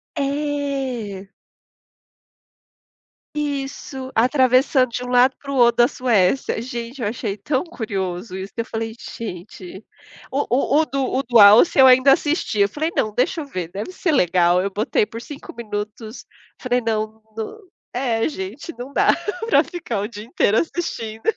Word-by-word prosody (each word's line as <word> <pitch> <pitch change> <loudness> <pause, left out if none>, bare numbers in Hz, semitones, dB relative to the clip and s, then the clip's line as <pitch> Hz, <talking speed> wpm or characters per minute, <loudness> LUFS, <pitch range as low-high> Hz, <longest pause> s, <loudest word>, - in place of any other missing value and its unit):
É. 275 -8 -3 2.0
Isso, 275 -2 -4
atravessando 255 +1 +3
de 245 - -4
um - - -7
lado 250 +1 +4
para 280 - -8
o 275 - -2
outro 240 -2 +4
da - - +2
Suécia. 235 -3 +1
Gente, 240 +2 -6
eu 215 - 0
achei 215 -2 -3
tão 260 - -2
curioso 195 - -4
isso 190 +1 -7
que - - -4
eu - - -1
falei: 225 0 -4 0.2
"Gente" 185 -2 -8 0.5
o 280 +2 -1
o 275 +4 +3
o - - 0
do 275 -1 -2
o 265 - 0
do 240 -2 +2
Alce 210 +10 +7
eu 265 - +9
ainda 260 +2 +7
assisti, 290 - 0
eu 200 - +5
falei: 310 +9 -2
"Não, 215 - +1
deixa 290 +8 0
eu 295 - -6
ver, 185 -11 -5
deve 205 - -5
ser 365 -2 -1
legal", 180 - +3
eu 195 - -1
botei 210 +1 0
por 230 +2 -8
5 285 +2 -10
minutos, 215 0 -6 0.3
falei: 250 -1 0
"Não 220 0 -2
nã" 225 - -5 0.4
é, 240 -3 0
gente, 250 - -7
não 250 +3 -7
dá - - +2 0.4
para - - +5
ficar 315 - -4
o 205 - -3
dia 210 -2 -9
inteiro 225 -2 +1
assistindo. 230 -11 -3
240 Hz, 165 wpm, -21 LUFS, 210-275 Hz, 2.0 s, eu